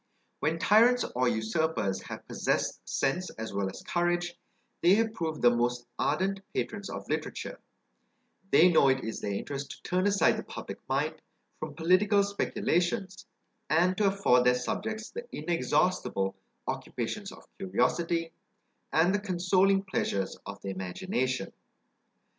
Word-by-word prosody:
When 160 +2 0
tyrants, 230 +7 +5
or 125 0 +2
usurpers, 110 -2 0
have - - -9
possessed - - -1
sense 180 +7 0
as 110 -2 -5
well 100 -1 0
as 95 - -9
courage, 175 0 0 0.5
they 175 +3 +6
have 225 0 +1
proved 160 - -3
the 120 0 +6
most 120 0 0
ardent 195 +1 +1 0.2
patrons 200 -2 -3
of - - -6
literature; - - -3 0.9
they 170 +4 +6
know 150 -4 +5
it 130 0 +2
is 110 - -4
their 100 - -2
interest 140 +5 -4
to - - -10
turn 185 +2 +1
aside 200 -1 +3
the - - -4
public - - -7
mind - - -1 0.4
from - - -6
political 200 +5 +4
speculations, 190 -2 -1 0.4
and 175 +4 +3
to 210 - +3
afford 195 -11 +4
their 125 0 +5
subjects 220 +12 -3
the 475 +2 -7
inexhaustible 150 - 0 0.3
occupations - - -4
of - - -14
curiosity, 165 - 0 0.6
and 170 +4 +4
the 205 - +2
consoling 195 0 +2
pleasures 100 - -1
of - - -7
the 100 - -4
imagination. 125 - -2
170 Hz, 140 wpm, -29 LUFS, 125-195 Hz, 0.9 s, they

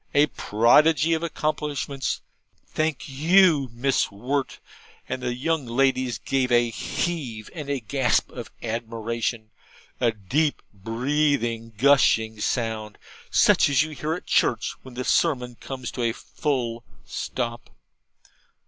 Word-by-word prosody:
A 145 +1 +6
prodigy 150 +6 +3
of 160 - 0
accomplishments! 150 -4 -2 0.4
Thank 155 -2 -2
you, 155 0 +4
Miss 125 +3 +1
Wirt' 130 +7 -2 0.5
and 130 - -4
the 125 -1 -2
young 145 +1 -1
ladies 130 -1 +1
gave 130 +5 -1
a 120 -1 +3
heave 120 -4 -3
and 150 -4 -6
a 140 -1 0
gasp 120 +3 +1
of 120 -3 -8
admiration 115 0 -3 0.5
a 120 -2 +3
deep 135 - -1
breathing 115 +1 -1
gushing 115 -4 +4
sound, 110 -2 -2 0.3
such - - +5
as 140 0 +4
you 155 - -6
hear 155 +2 -2
at 180 - -9
church - - +2
when 130 -2 -12
the 130 - -3
sermon 125 -5 +1
comes 130 +1 -7
to 125 - -5
a 115 -1 +1
full 120 -4 -3 0.2
stop. 120 -2 -4
130 Hz, 125 wpm, -24 LUFS, 115-145 Hz, 0.5 s, A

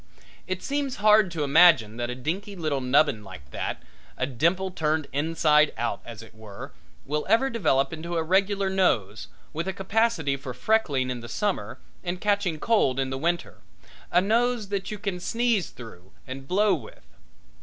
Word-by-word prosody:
It 185 0 -3
seems 280 -2 -2
hard 210 -1 +5
to 165 -3 -3
imagine 140 -7 +5
that 120 0 -2
a 125 - -3
dinky 190 - -4
little 155 -6 -2
nubbin 130 -3 +2
like 90 -10 -12
that, - - -4 0.3
a 130 - 0
dimple 170 +9 0
turned 155 -3 0
inside 150 0 +3
out, 120 +1 -2
as 115 -2 -9
it 115 - -15
were, 110 -2 -10 0.3
will 150 +2 -1
ever 265 +4 +3
develop 140 - +1
into 170 +2 -4
a 165 - +1
regular 195 +3 +1
nose, 115 - 0 0.3
with 165 +4 -3
a 190 - -1
capacity 195 -6 0
for 130 -2 -7
freckling 140 - +1
in 125 - -4
the 120 0 -9
summer 205 - -2 0.3
and 180 0 -3
catching 200 -6 0
cold 150 - +2
in 135 0 -1
the 130 - -2
winter 170 +3 -1 0.5
a 180 - +4
nose 230 +1 +1
that 200 -1 -3
you 210 - -4
can 200 -3 -3
sneeze 230 -1 0
through 95 -7 -13
and 135 +1 -8
blow 200 +3 +3
with. - - -7
165 Hz, 175 wpm, -26 LUFS, 130-200 Hz, 0.5 s, hard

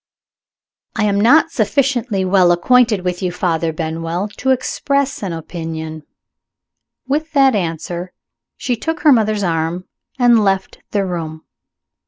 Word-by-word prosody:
"I 220 - 0
am 200 -1 +1
not 305 +9 +5
sufficiently 240 -4 0
well 185 -2 +4
acquainted 225 +3 +3
with 180 -1 -2
you, 180 -2 -1
Father 170 -2 -1
Benwell, 165 +4 -3
to 265 - -2
express 275 +2 0
an 195 -4 -3
opinion." 160 -1 -6 1.1
With 305 +4 -2
that 270 -2 +5
answer, 175 -1 -3 0.5
she 245 - -1
took 320 +8 -4
her 305 - +6
mother's 215 -4 +2
arm 165 +1 -1 0.3
and 240 -3 +4
left 195 -1 -1
the 200 -2 0
room. 160 -3 -5
195 Hz, 130 wpm, -18 LUFS, 170-245 Hz, 1.1 s, her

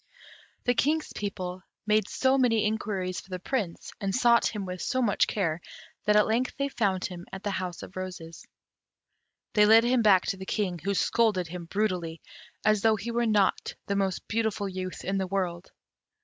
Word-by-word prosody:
The 245 - +2
King's 305 +5 0
people 185 -3 -4 0.2
made 215 -1 +2
so 265 0 +2
many 235 -5 +3
inquiries 200 -4 -2
for - - -20
the 185 - -3
Prince, 190 -3 -3
and 195 -1 -1
sought 240 -2 +4
him 210 -3 -4
with 180 -1 -5
so 255 - -1
much 225 -6 +2
care, 170 -5 -1 0.4
that 210 - +4
at 210 - +6
length 235 +3 0
they 280 0 0
found 195 -8 0
him 180 -2 -7
at 190 - -7
the 205 - -1
House 185 -2 -4
of - - -11
Roses. 180 -3 -7 1.1
They 210 -1 +5
led 225 +1 +7
him 245 0 +3
back 195 -4 +5
to 195 - -2
the 190 - -7
King, 185 -5 -1
who 200 +5 -1
scolded 205 -6 +2
him 175 0 -6
brutally, 180 -4 -1 0.5
as 215 -1 +4
though 220 0 +4
he 215 +4 -5
were 235 0 +1
not 210 -3 +1
the 200 - -1
most 195 -2 -1
beautiful 220 -2 -1
youth 185 -1 -5
in 195 0 0
the 190 - -1
world. 180 -2 -2
200 Hz, 190 wpm, -28 LUFS, 185-220 Hz, 1.1 s, led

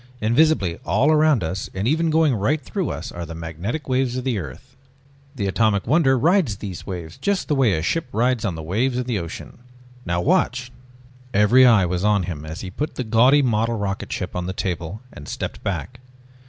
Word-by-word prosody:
Invisibly 115 - +2
all 150 +5 +3
about 150 - +3
us, 90 +4 -3
and 95 +4 -1
even 160 +4 +2
going 160 -3 +3
right 125 +9 +1
through 175 +4 -3
us, - - -5
are 85 - -6
the 80 0 -7
magnetic 85 - -5
waves 130 -1 0
of 130 - -3
the 125 -5 -1
earth. 75 - -10 0.6
The 105 -6 -2
Atomic 100 0 +1
Wonder 135 0 +3
rides 155 - +2
these 95 -4 -7
waves 85 -5 -6
just 200 -2 -1
the - - +1
way 130 -7 +3
a 80 -1 -1
ship 165 - -1
rides 120 +2 +1
the 85 -8 -3
waves 120 +10 0
in 125 - 0
the 120 -5 -1
ocean. 85 +6 -8 0.4
Now 85 -1 -1
watch...." 130 - +1 0.6
Every 120 +6 +6
eye 110 -6 +5
was 90 +1 -2
on 105 -2 +3
him 80 -4 -5
as 80 +2 -6
he 95 - -6
put 150 +10 -4
the 130 - -2
gaudy 125 +6 +4
model 115 -1 +1
rocketship 100 -2 -4
on 90 0 -2
top - - -4
of 95 - -5
the - - -9
table 90 +3 -4
and 75 - -11
stepped - - -5
back. 125 -1 -4
110 Hz, 205 wpm, -22 LUFS, 90-135 Hz, 0.6 s, Every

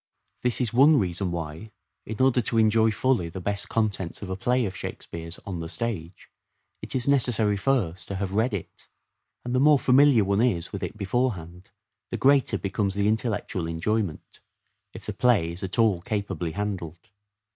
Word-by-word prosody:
This 125 -1 0
is 120 -3 -1
one 145 +5 +6
reason 90 -2 -1
why, 85 +4 -5 0.4
in 110 - -6
order 130 -1 +4
to 115 +1 -2
enjoy 110 0 +4
fully 115 -5 +1
the 90 - -7
best 100 +2 -3
contents 105 -5 -2
of 95 - -5
a - - -1
play 125 +5 +1
of 95 -1 -4
Shake - - -6
speare's 85 +1 -8
on 95 -4 -4
the 80 0 -5
stage, 95 -7 -4 0.5
it - - -4
is 125 0 0
necessary 120 -6 +2
first 100 -7 0
to 100 - -4
have 95 0 -3
read 110 +5 +2
it; 100 -4 -7 0.6
and 120 - -3
the 130 - +2
more 150 +1 +6
familiar 130 -3 +5
one 100 +2 +1
is 95 -9 0
with 100 - -4
it - - -5
beforehand 95 -5 -2 0.4
the - - -3
greater 135 -1 +3
becomes 100 0 -2
the 100 0 +1
intellectual 110 -5 -1
enjoyment, 85 +2 -3 0.5
if - - -10
the - - -4
play 110 -10 +2
is 85 - -5
at 95 -1 -4
all 110 -6 +3
capably 95 -6 -3
handled. 90 -5 -5
105 Hz, 180 wpm, -26 LUFS, 90-120 Hz, 0.6 s, one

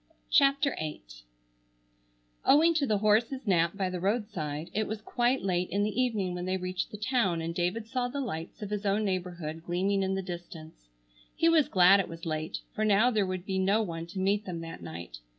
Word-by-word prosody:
CHAPTER 280 -1 +4
VIII 155 - -5 1.4
Owing 320 +4 +5
to 295 -4 +1
the 215 - +2
horse's 225 +6 +2
nap 170 -2 +2
by 190 -2 0
the 180 - -3
roadside, 190 -7 -2
it 215 +1 0
was 220 0 -4
quite 240 +4 0
late 180 -2 0
in 200 +3 0
the 215 +4 0
evening 210 -8 0
when 180 0 -4
they 185 0 0
reached 185 0 -3
the 210 - -8
town 215 -6 +1
and 165 +1 -3
David 180 +6 -1
saw 245 +1 -1
the 275 +3 -4
lights 175 -7 -5
of 205 - -6
his 210 0 -2
own 205 +1 +1
neighborhood 175 -4 -3
gleaming 190 +3 0
in 190 0 0
the 195 - -2
distance. 165 - -9 0.5
He 330 - +3
was 320 -3 +4
glad 185 0 +6
it 195 - -1
was 165 0 -8
late, 155 -1 -3
for 215 - -1
now 215 +4 +4
there 210 -4 +1
would 185 -1 -4
be 190 -1 -1
no 200 +4 +3
one 165 -3 -5
to 185 +3 -10
meet 200 +2 +1
them 170 -3 -5
that 165 - -8
night. 80 -7 -8
195 Hz, 205 wpm, -29 LUFS, 175-220 Hz, 1.4 s, glad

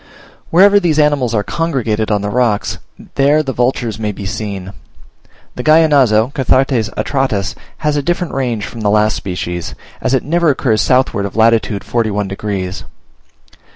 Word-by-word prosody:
Wherever 200 +4 +6
these 170 -5 0
animals 145 -6 +2
are 105 - +1
congregated 120 -10 -1
on 105 -2 0
the 105 - -2
rocks, 115 -4 0 0.3
there 145 +3 +3
the 135 -2 -3
vultures 120 -3 -1
may 105 -1 -2
be 100 0 -8
seen. 100 -3 -5 0.8
The - - -5
Gallinazo 140 -7 +4
(Cathartes 130 -3 +1
atratus) 130 -8 -1 0.2
has 150 -1 -1
a 145 - +1
different 175 +3 -2
range 120 -6 -2
from 115 - -8
the 105 - +1
last 105 +1 +2
species, 90 -2 -5 0.3
as 135 - +1
it 130 - 0
never 170 +2 +1
occurs 125 -6 +1
southward 125 -6 +1
of - - -12
lat. 115 +1 +5 0.3
41 105 -4 -1
degs. 95 -2 -4
120 Hz, 155 wpm, -15 LUFS, 105-140 Hz, 0.8 s, Wherever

